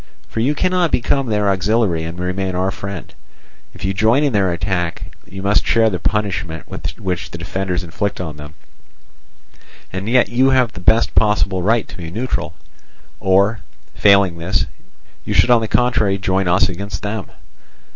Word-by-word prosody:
For - - -5
you 135 +6 +1
cannot 180 +1 +1
become 135 +2 +1
their 105 -2 +1
auxiliary 95 -3 +1
and 85 +2 -6
remain 90 +1 -2
our 95 +2 0
friend; 100 -3 -7 0.6
if - - -6
you 95 - 0
join 110 +8 +3
in 140 -4 +1
their 95 -3 +2
attack, 85 -1 -3
you 95 0 -8
must 100 +1 +3
share 115 -1 +3
the 90 - -2
punishment 95 -5 -2 0.3
which 90 -2 -3
the - - -7
defenders 90 +1 -3
inflict 100 +4 -3
on 80 -4 -5
them. 75 +1 -10 1.4
And 95 +3 -3
yet 125 0 +4
you 130 +3 +3
have 130 -4 +2
the - - -8
best 110 +6 +3
possible 105 -3 +2
right 110 +4 +1
to - - -11
be 85 -3 -6
neutral, 105 -4 -3 0.6
or, 100 +3 +3 0.3
failing 100 -4 +4
this, 85 -2 0 0.6
you - - -3
should 125 - +4
on 120 -2 +6
the 110 - -2
contrary 110 -5 +2
join 95 -1 0
us 90 +2 +3
against 95 +1 -5
them. 105 -1 -3
100 Hz, 165 wpm, -19 LUFS, 90-110 Hz, 1.4 s, on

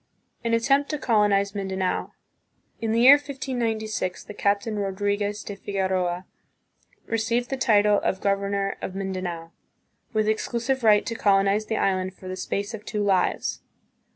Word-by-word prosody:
An 230 0 +2
attempt 275 +5 +2
to 300 - -1
Colonize 205 -5 +2
Mindanao. 190 -2 -2 0.7
In 225 -1 -1
the 230 +1 +2
year 270 +4 +9
1596, 235 -8 -3
the - - -9
Captain 205 +1 0
Rodriguez 205 +1 -1
de 205 - -6
Figueroa 190 -2 -1 0.8
received 230 +2 -1
the - - +1
title 210 -5 +4
of 190 - -1
governor 200 0 0
of 185 - -5
Mindanao, 185 -4 -4 0.6
with 215 -2 +1
exclusive 235 +4 -1
right 210 -2 +5
to - - -3
colonize 200 0 +2
the 220 - -1
island 185 -1 0
for 185 - -11
"the 185 - -4
space 200 +3 -3
of 215 -1 -7
two 210 -1 -2
lives." 190 -3 +1
205 Hz, 145 wpm, -25 LUFS, 195-230 Hz, 0.8 s, year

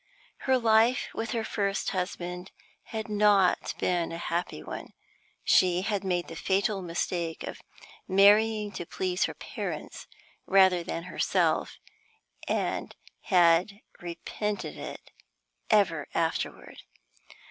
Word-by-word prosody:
Her 260 0 +5
life 230 +1 +3
with 225 - -3
her 230 -3 -1
first 200 -2 -1
husband 180 -1 -4 0.4
had 220 -2 -5
not 205 -3 +3
been 175 -2 0
a 165 - -4
happy 170 +1 -3
one. - - -8 0.5
She 180 0 +4
had 200 -1 -1
made 180 -2 -1
the 165 - -8
fatal 195 +3 0
mistake 170 -1 -3
of - - -7 0.5
marrying 210 +2 +4
to 175 - -6
please 185 -1 0
her - - -5
parents - - -6 0.4
rather 190 -2 +5
than 170 0 -4
herself, 180 - 0 0.7
and - - -2 0.3
had 180 +2 +4 0.2
repented 205 +4 -4
it - - -9 0.6
ever 175 -9 +3
afterward. 165 -1 -2
190 Hz, 115 wpm, -28 LUFS, 175-210 Hz, 0.7 s, Her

